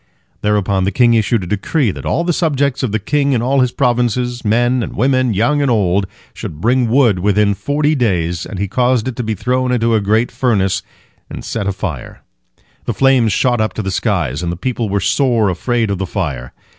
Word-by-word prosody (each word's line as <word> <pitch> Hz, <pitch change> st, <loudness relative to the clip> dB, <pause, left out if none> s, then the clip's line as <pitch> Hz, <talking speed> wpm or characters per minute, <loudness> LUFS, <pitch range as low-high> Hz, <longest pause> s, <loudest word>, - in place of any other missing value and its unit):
Thereupon 100 Hz, -2 st, +1 dB
the 100 Hz, -, 0 dB
king 120 Hz, +3 st, +3 dB
issued 110 Hz, -1 st, +1 dB
a -, -, -5 dB
decree 105 Hz, -, 0 dB
that -, -, -7 dB
all 170 Hz, -, 0 dB
the 175 Hz, 0 st, 0 dB
subjects 140 Hz, -5 st, 0 dB
of 130 Hz, -6 st, -1 dB
the 110 Hz, -, +1 dB
king 140 Hz, +6 st, 0 dB
in 115 Hz, -2 st, 0 dB
all 135 Hz, +2 st, +1 dB
his 125 Hz, -1 st, +2 dB
provinces, 125 Hz, -1 st, 0 dB
men 120 Hz, +3 st, +2 dB
and 110 Hz, -, -5 dB
women, 130 Hz, -1 st, +1 dB
young 145 Hz, +9 st, +2 dB
and 140 Hz, -, +1 dB
old, 100 Hz, -4 st, +1 dB, 0.3 s
should 75 Hz, -, -7 dB
bring 120 Hz, +4 st, +1 dB
wood 115 Hz, -6 st, +3 dB
within 100 Hz, +2 st, +2 dB
forty 145 Hz, +7 st, 0 dB
days, 90 Hz, -, 0 dB
and 100 Hz, -, -7 dB
he 100 Hz, +2 st, -2 dB
caused 125 Hz, +2 st, +1 dB
it 130 Hz, -, -3 dB
to -, -, -1 dB
be 110 Hz, -1 st, -2 dB
thrown 125 Hz, +5 st, -1 dB
into 115 Hz, -2 st, +1 dB
a 110 Hz, -, +2 dB
great 110 Hz, +4 st, +1 dB
furnace 100 Hz, -6 st, 0 dB, 0.5 s
and -, -, -8 dB
set 105 Hz, -3 st, -3 dB
afire. 95 Hz, -, -5 dB, 0.6 s
The -, -, -2 dB
flames 130 Hz, -5 st, +3 dB
shot 120 Hz, +3 st, +1 dB
up 110 Hz, -, -1 dB
to 110 Hz, -, -4 dB
the 95 Hz, -, -2 dB
skies, 85 Hz, -, -1 dB
and 85 Hz, -1 st, -2 dB
the -, -, -4 dB
people 120 Hz, +1 st, -2 dB
were 100 Hz, +1 st, 0 dB
sore 120 Hz, -3 st, +2 dB
afraid 115 Hz, +4 st, -1 dB
of 100 Hz, -, -2 dB
the 95 Hz, -, -2 dB
fire. 75 Hz, -, -4 dB
115 Hz, 210 wpm, -16 LUFS, 100-125 Hz, 0.6 s, king